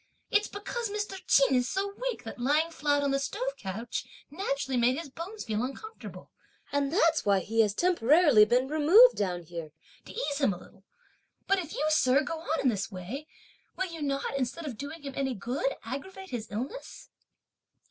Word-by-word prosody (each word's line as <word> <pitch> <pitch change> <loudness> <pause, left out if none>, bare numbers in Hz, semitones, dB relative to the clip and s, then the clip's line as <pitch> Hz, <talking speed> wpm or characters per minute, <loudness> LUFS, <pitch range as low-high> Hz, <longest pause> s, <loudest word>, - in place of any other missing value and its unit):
It's 415 +1 +3
because 430 +3 -4
Mr. 415 -2 -4
Ch'in 275 -1 +5
is 250 0 +2
so 395 +1 -2 0.2
weak 470 - -5
that 225 +1 -8
lying 300 +6 +2
flat 290 -2 +1
on 280 - +1
the 275 - +1
stove 275 0 -3
couch 225 0 -4 0.3
naturally 275 -5 -2
made 245 +2 +3
his 315 -4 -6
bones 370 +9 -7
feel 215 -1 -2
uncomfortable; 435 - -8 0.4
and 285 -1 0
that's 330 -3 +3
why 200 -1 +4
he 225 +3 +2
has 205 -2 +1
temporarily 300 -6 +5
been 245 +4 +2
removed 325 - +7
down 180 -3 -2
here 165 -1 -7 0.4
to - - -10
ease 300 - -2
him 270 -9 +3
a - - -7
little. 190 - -17 0.6
But 390 0 +3
if 330 -4 -6
you, 300 - 0
sir, 275 -2 +4
go 320 +2 -4
on 320 0 -1
in 265 - +3
this 205 -2 -2
way, 210 +11 -6 0.5
will 370 -2 -2
you 325 - -7
not, 275 -1 -1
instead 275 +5 -2
of 270 -6 -4
doing 285 +6 -7
him 275 -1 -6
any 265 -2 -1
good, 250 +6 -2
aggravate 375 - -7
his 235 -3 -4
illness?" 260 - -6
280 Hz, 190 wpm, -29 LUFS, 240-335 Hz, 0.6 s, removed